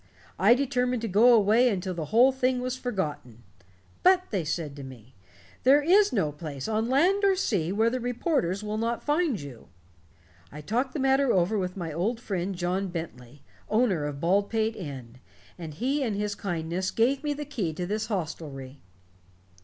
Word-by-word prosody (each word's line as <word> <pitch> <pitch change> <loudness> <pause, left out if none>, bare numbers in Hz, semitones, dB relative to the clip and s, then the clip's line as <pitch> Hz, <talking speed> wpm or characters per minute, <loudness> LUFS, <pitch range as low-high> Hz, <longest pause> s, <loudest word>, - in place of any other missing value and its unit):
I 205 +6 +6
determined 250 -2 -1
to - - -1
go 220 +5 +5
away 225 +2 +5
until 190 -3 -2
the 165 -3 -4
whole 240 - +5
thing 255 -1 0
was 255 0 -3
forgotten. 150 - -4 0.6
'But', 370 0 +3
they 195 -5 -1
said 150 -2 -3
to 140 - -8
me, 130 -2 -12 0.5
'there 280 +3 +5
is 395 +5 +4
no 195 - 0
place, 145 -3 -7
on 220 +1 -1
land 360 +10 +3
or 395 -1 +4
sea, 195 - -1
where 220 +3 +2
the 255 - -2
reporters 245 - -1
will 215 +1 -3
not 230 +1 -2
find 295 - +1
you'. 140 -5 -10 0.8
I 150 - -9
talked 245 - -1
the - - -2
matter 270 -1 +3
over 185 +3 +2
with 185 -2 -2
my 165 -4 -4
old 210 +9 -1
friend, 195 -4 -3
John 180 +2 -1
Bentley, 145 -6 -8 0.3
owner 215 -9 +1
of 145 -1 -5
Baldpate 205 +6 +1
Inn, 130 - -8 0.4
and 165 -3 -8
he 270 - -1
in 230 -6 -1
his 205 0 -2
kindness 175 -1 -3
gave 260 +5 +1
me 295 -1 -1
the 295 +1 -5
key 220 - -3
to 175 +3 -4
this 215 +3 -2
hostelry." 145 - -5
205 Hz, 175 wpm, -27 LUFS, 165-250 Hz, 0.8 s, I